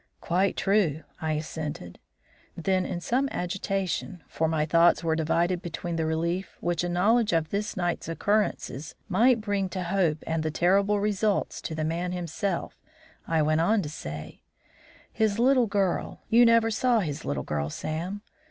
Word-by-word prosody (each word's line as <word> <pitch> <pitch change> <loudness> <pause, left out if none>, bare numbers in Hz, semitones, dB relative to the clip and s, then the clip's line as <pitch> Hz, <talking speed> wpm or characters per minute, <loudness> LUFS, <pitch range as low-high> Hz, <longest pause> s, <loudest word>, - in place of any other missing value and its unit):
"Quite 185 +3 +1
true." 185 -7 +1 0.2
I 160 -1 0
assented. 150 - -5 0.6
Then, 185 +2 +1
in 175 - -4
some 260 +9 0
agitation, 185 -1 -3
for 160 - -1
my 155 -1 +1
thoughts 170 +2 +4
were 160 -1 +1
divided 170 +3 +1
between 175 0 -4
the 160 -1 0
relief 170 +4 -2
which 175 0 -1
a 175 - -1
knowledge 210 +5 +3
of 165 -1 +1
this 210 0 -2
night's 175 -2 -2
occurrences 165 -6 -1
might 240 0 +4
bring 200 -3 -1
to 185 0 -4
Hope 170 -4 0
and 160 0 -1
the 155 - -1
terrible 195 +6 +2
results 205 0 0
to 160 - -5
the 155 0 -1
man 175 +3 -2
himself, 175 +1 -3 0.5
I 160 -2 +2
went 155 +1 +2
on 210 +4 +2
to 150 - -5
say: 75 - -8 0.7
"His 215 -2 +1
little 250 0 +4
girl 200 -3 -1
you 235 +1 +7
never 230 -1 +4
saw 235 +1 +2
his 150 -6 -4
little 65 -2 -2
girl, 75 -1 -2
Sam. 175 - -4
175 Hz, 160 wpm, -27 LUFS, 160-205 Hz, 0.7 s, you